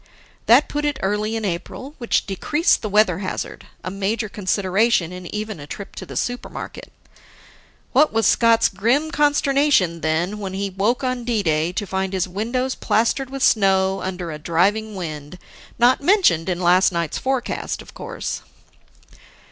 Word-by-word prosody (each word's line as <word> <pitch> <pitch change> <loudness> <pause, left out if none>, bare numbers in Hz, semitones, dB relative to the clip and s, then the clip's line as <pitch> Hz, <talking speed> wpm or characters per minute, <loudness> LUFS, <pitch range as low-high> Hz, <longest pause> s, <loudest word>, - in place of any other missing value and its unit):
That 250 +6 +6
put 295 0 -3
it 295 -2 0
early 210 +3 0
in 220 -1 -2
April, 200 +10 -5
which 235 - 0
decreased 295 - +1
the 215 - -3
weather 200 -4 +3
hazard 190 - -5 0.2
a 185 - -4
major 205 +3 -1
consideration 195 -1 +1
in 180 -1 -8
even 210 -2 -5
a 145 - -9
trip 200 +6 -8
to - - -7
the - - -6
Supermarket. 245 0 -5 1.0
What 295 +4 +4
was 225 0 +1
Scott's 230 -1 +4
grim 240 +11 0
consternation, 280 - +2
then, 170 +6 -1
when 195 -2 -5
he 195 0 -2
woke 215 +8 0
on 255 -1 -1
D 230 -3 0
day 160 0 +1
to 205 - -2
find 190 0 -2
his 185 -1 0
windows 240 +7 -2
plastered 235 +4 0
with 270 -1 -4
snow 195 -2 +3
under 180 -3 -4
a 150 - -7
driving 200 +7 +1
wind 155 -2 -6 0.4
not 245 +3 +4
mentioned 285 - +3
in 180 -1 -1
last 180 +1 +4
night's 170 -3 -2
forecast 260 -2 -2
of - - -16
course. - - -5
205 Hz, 160 wpm, -21 LUFS, 185-245 Hz, 1.0 s, That